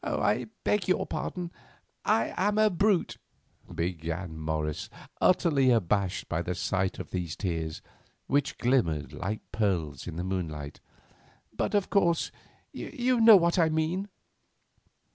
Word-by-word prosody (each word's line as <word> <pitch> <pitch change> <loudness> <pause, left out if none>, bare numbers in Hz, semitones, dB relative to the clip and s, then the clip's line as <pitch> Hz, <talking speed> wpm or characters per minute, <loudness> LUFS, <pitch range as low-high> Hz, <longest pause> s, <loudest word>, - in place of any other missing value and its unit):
"I - - 0 0.2
beg 210 -4 +1
your 185 - +2
pardon; 175 -2 -4 0.5
I 115 - +2
am 205 +3 +1
a 215 -1 +4
brute," 195 +1 +1 0.6
began 85 0 -3
Morris, 80 -1 -2 0.3
utterly 150 -8 +4
abased 100 -4 +1
by 85 0 -1
the 90 +1 -3
sight 95 +1 -1
of - - -7
these 90 -4 -3
tears, 80 -5 -3 0.4
which 140 0 0
glimmered 85 - +1
like 105 +4 -3
pearls 85 - -1
in - - -5
the 85 - -3
moonlight, 80 -6 -4 0.8
"but, - - -1
of 200 -2 +1
course, 170 -5 +2 0.4
you 250 0 -1
know 225 -2 +10
what 170 0 +2
I 165 -1 +4
mean." 160 +6 -1
105 Hz, 130 wpm, -28 LUFS, -, 0.8 s, know